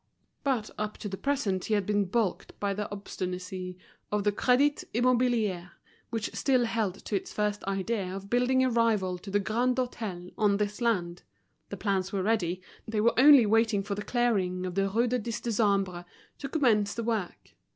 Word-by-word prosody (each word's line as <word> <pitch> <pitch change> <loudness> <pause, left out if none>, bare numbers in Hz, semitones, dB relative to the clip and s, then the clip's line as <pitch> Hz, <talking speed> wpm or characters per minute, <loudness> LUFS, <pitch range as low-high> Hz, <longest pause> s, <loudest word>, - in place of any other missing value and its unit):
Bat 250 -6 0
up 210 0 -3
to 210 - -6
the 195 - -4
present 210 -7 -1
he 215 - +1
had 205 -2 0
been 205 0 +1
baulked 210 0 -2
by 200 -1 0
the 205 +1 -4
obstinacy 185 -2 -5 0.3
of 210 -1 0
the 205 - +3
Crédit 260 +7 +2
Immobilier, 235 -7 +1 0.4
which 225 -2 -3
still 255 -3 +2
held 220 -5 -1
to 210 - -2
its 195 - -3
first 210 -1 -1
idea 195 +2 -1
of 195 0 -7
building 250 +3 +2
a 260 - +3
rival 215 -6 +1
to 195 - -10
the 205 +1 +2
Grand 240 +5 +1
Hôtel 215 -8 -4
on 205 -2 +3
this 210 +2 -2
land. 180 -7 0 0.5
The 200 - -6
plans 190 -1 -1
were 195 -2 -1
ready, 185 -4 0 0.2
they 220 -1 -1
were 230 +3 +4
only 275 -2 +8
waiting 220 -1 +2
for 200 +1 -3
the 205 - -4
clearing 200 -7 0
of 180 - -4
the 195 +1 +1
Rue 230 +5 +2
du 250 +1 0
Dix 230 0 -4
Décembre 200 -6 0 0.3
to 275 - -5
commence 220 -9 +2
the 230 - -3
work. 220 -6 -3
210 Hz, 185 wpm, -29 LUFS, 195-235 Hz, 0.5 s, only